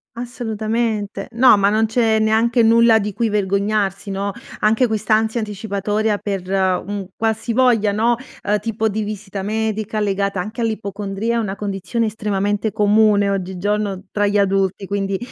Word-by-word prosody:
Assolutamente. 225 -3 -3
No, 245 0 +6
ma 200 0 +3
non 215 +2 +2
c'è 225 -1 +2
neanche 225 +2 +3
nulla 230 0 +5
di 210 0 -3
cui 230 +2 0
vergognarsi, 200 0 0
no. 200 +1 -2 0.3
Anche 220 +4 +3
quest'ansia 220 +1 +1
anticipatoria 210 0 -1
per 195 -3 -4
un 190 +1 -1
qualsivoglia, 225 -1 +1
no, 230 +3 +2 0.3
uhm, 210 +1 +1
tipo 220 0 -1
di 215 +1 -2
visita 205 -1 -5
medica, 215 +1 -2
legata 200 -2 0
anche 215 +5 -7
all'ipocondria, 215 0 -2
è - - +1
una 205 -4 -2
condizione 205 +3 -2
estremamente 205 0 -1
comune 210 -1 +3
oggigiorno 195 +1 -2
tra 205 0 +1
gli 205 +1 +1
adulti, 195 0 +1
quindi, 195 0 -2
210 Hz, 140 wpm, -19 LUFS, 200-220 Hz, 0.3 s, No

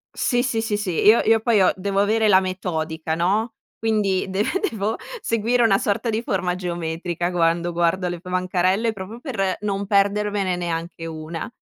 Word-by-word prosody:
Sì, 245 -1 +1
sì, 225 -4 0
sì, 220 -2 -1
sì. 205 -3 -2
Io 220 +3 +7
io 225 0 +4
poi 220 -2 +2
ho 185 - +5
devo 195 +1 -1
avere 220 +2 +3
la 190 -3 +6
metodica, 160 -4 -3
no, 210 +7 0 0.2
quindi 210 -4 +1
de 195 +2 0 0.3
devo 215 +1 -2 0.2
seguire 230 - +1
una 195 -4 +4
sorta 215 +3 -1
di 220 - -1
forma 185 -5 -1
geometrica 175 0 -3
quando 170 0 +1
guardo 175 +2 +1
le 175 - -5
bancarelle, 185 +4 0
proprio 200 +4 -8
per 195 - -2
non 200 -1 -2
perdermene 200 -1 +1
neanche 170 -1 -4
una. 160 +4 -6
195 Hz, 165 wpm, -22 LUFS, 175-215 Hz, 0.3 s, Io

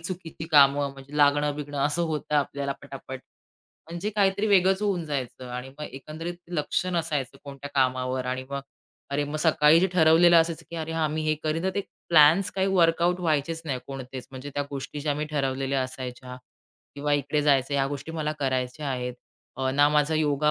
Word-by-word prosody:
चुकीची 165 -2 -6
कामं 140 -1 +5
म्हणजे 140 +2 -11
लागणं 145 0 +3
बिगणं 145 -1 -5
असं 160 +3 0
होतं 155 -2 -2
आपल्याला 140 0 -1
पटापट. 135 -2 -8 0.7
म्हणजे 175 +5 -3
काहीतरी 200 0 +1
वेगळंच 190 -1 +4
होऊन 195 -5 0
जायचं 130 -4 -4
आणि 125 +1 -5
मग 150 - -5
एकंदरीत 155 +6 -7 0.2
लक्षच 170 +2 -1
नसायचं 150 -6 -2
कोणत्या 140 0 -8
कामावर 130 -1 +1
आणि 130 +1 -3
मग 140 0 -3 0.5
अरे 145 +1 0
मग 145 +2 -4
सकाळी 155 0 +5
जे 190 - +4
ठरवलेलं 170 0 +6
असायचं, 165 0 -2
की 170 - -6
अरे 160 0 -4
हां 160 -1 0
मी 155 +1 -2
हे 155 0 +1
करीन 155 +2 -1
तर 190 - +2
ते 200 - +1 0.3
प्लॅन्स 165 +4 +6
काही 190 0 0
वर्कआउट 175 -1 +3
व्हायचेच 165 0 0
नाही 135 -5 -2
कोणतेच, 130 -2 -7
म्हणजे 130 +2 -8
त्या 145 - 0
गोष्टी 140 +1 -5
ज्या 145 0 0
आम्ही 150 +1 -3
ठरवलेल्या 135 -1 0
असायच्या 125 0 -7 0.6
किंवा 145 +1 -2
इकडे 145 +1 +1
जायचं 140 -1 +2
ह्या 135 -1 +2
गोष्टी 145 +3 -6
मला 155 -2 -2
करायच्या 130 +2 -2
आहेत. 125 -1 -3 0.4
अ, 130 0 0
ना 145 +2 +4
माझा 150 +1 +2
योगा 150 -1 +2
145 Hz, 180 wpm, -26 LUFS, 135-165 Hz, 0.7 s, ठरवलेलं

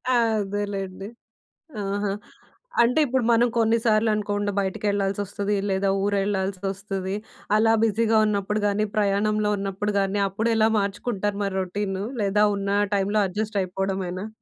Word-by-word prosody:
అదేలెండి. 205 -4 -1 0.8
ఆహా! 200 +1 -1 0.7
అంటే, 245 +6 +2
ఇప్పుడు 260 -2 0
మనం 235 +1 +4
కొన్నిసార్లు 225 -1 +3
అనుకోకుండా 205 -1 -1
బయటకెళ్ళాల్సొస్తది, 200 +1 -1
లేదా 195 +1 +1
ఊరెళ్ళాల్సొస్తది. 195 -1 -2 0.4
అలా 225 +1 +4
బిజీగా 225 +1 +2
ఉన్నప్పుడు 210 0 -1
కానీ, 205 +1 +1
ప్రయాణంలో 210 +1 +2
ఉన్నప్పుడు 200 +1 -2
గాని, 195 +1 0
అప్పుడెలా 220 +2 +2
మార్చుకుంటారు? 200 0 -2
మరి 195 -1 -2
రొటీను 195 +1 -3 0.2
లేదా 200 +1 +3
ఉన్న 200 +1 +1
టైమ్‌లో 200 +2 +1
అడ్జస్ట్ 210 +3 -3
అయిపోవడమేనా? 190 +1 -3
205 Hz, 110 wpm, -24 LUFS, 195-215 Hz, 0.8 s, మనం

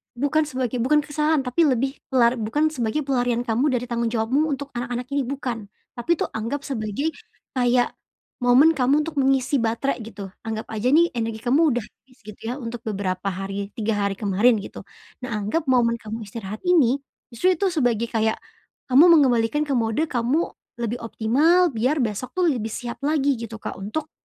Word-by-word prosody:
bukan 285 +5 +1
sebagai 260 -4 -3
bukan 300 +4 +4
kesalahan, 300 +1 +1
tapi 265 +5 +1
lebih 270 -1 +1 0.2
pelar 245 -1 +4
bukan 245 +8 0
sebagai 250 -3 -1
pelarian 245 -3 +1
kamu 250 +6 +2
dari 250 -1 -1
tanggung 235 -1 -1
jawabmu 240 +6 +1
untuk 280 +1 -5
anak-anak 245 +1 -3
ini, 280 -1 +1
bukan. 240 -5 -5 0.2
Tapi 315 +8 0
tuh, - - 0
anggap 230 +6 -3
sebagai, 260 +5 -2 0.4
kayak, 245 -1 +2 0.5
momen 275 +7 +6
kamu 275 +2 +3
untuk 325 - -6
mengisi 270 +1 +2
baterai, 230 +2 -1
gitu, 205 -3 -8 0.2
anggap 220 0 -4
aja 225 +4 -1
nih, 340 +3 +5
energi 225 -1 -2
kamu 260 +7 +2
udah 245 - 0
habis, 255 +4 -21
gitu 215 - -10
ya 245 +5 -4
untuk 235 -2 -6
beberapa 190 -3 -3
hari 195 +2 -5
3 220 -1 0
hari 195 -1 -5
kemarin, 210 +3 +3
gitu. 200 - -9 0.4
Nah, 250 - -4
anggap 210 +11 -1
momen 240 -2 +3
kamu 220 -1 -7
istirahat 210 0 -7
ini, 280 -7 +4 0.3
justru 360 +11 +2
itu 380 +3 0
sebagai, 240 -8 0
kayak, 220 -1 +1 0.6
kamu 290 +7 +8
mengembalikan 260 -1 +3
ke 295 - -4
mode 225 +7 +1
kamu 255 +7 0 0.3
lebih 235 +1 -2
optimal 295 +11 +3
biar 255 +4 +1
besok 225 - -4
tuh, 365 - +2
lebih 225 -5 -3
siap 240 -1 -5
lagi, 285 -4 +1
gitu, 230 -1 -6
Kak, - - -6
untuk 290 +11 -4
245 Hz, 175 wpm, -23 LUFS, 225-285 Hz, 0.6 s, kamu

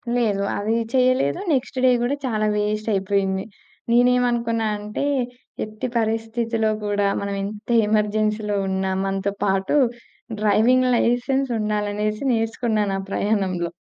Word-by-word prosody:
లేదు. 215 -5 +1 0.2
అది 215 +3 0 0.2
చేయలేదు. 255 - +2
నెక్స్ట్ 265 0 -2
డే - - +6
గూడా 245 +4 0
చాలా 215 -4 0
వేస్టయిపోయింది. 200 -2 0 0.5
నేనేమనుకున్నా 240 -2 +2
అంటే 210 +5 -4 0.6
ఎట్టి 215 +3 -5
పరిస్థితిలో 225 0 0 0.2
కూడా 205 0 0 0.2
మనం 200 0 -3
ఎంత 210 +3 -7 0.2
ఎమర్జెన్సీలో 210 0 0
ఉన్నా 190 0 -1
మనతో 195 +1 -1
పాటు 195 +5 +1 0.6
డ్రైవింగ్ 235 +5 +3
లైసెన్స్ 260 +3 +1
ఉండాలనేసి 210 +1 -1
నేర్చుకున్నాను 225 -3 0
ఆ - - -3
ప్రయాణంలో. 190 -5 0
215 Hz, 110 wpm, -22 LUFS, 205-235 Hz, 0.6 s, డే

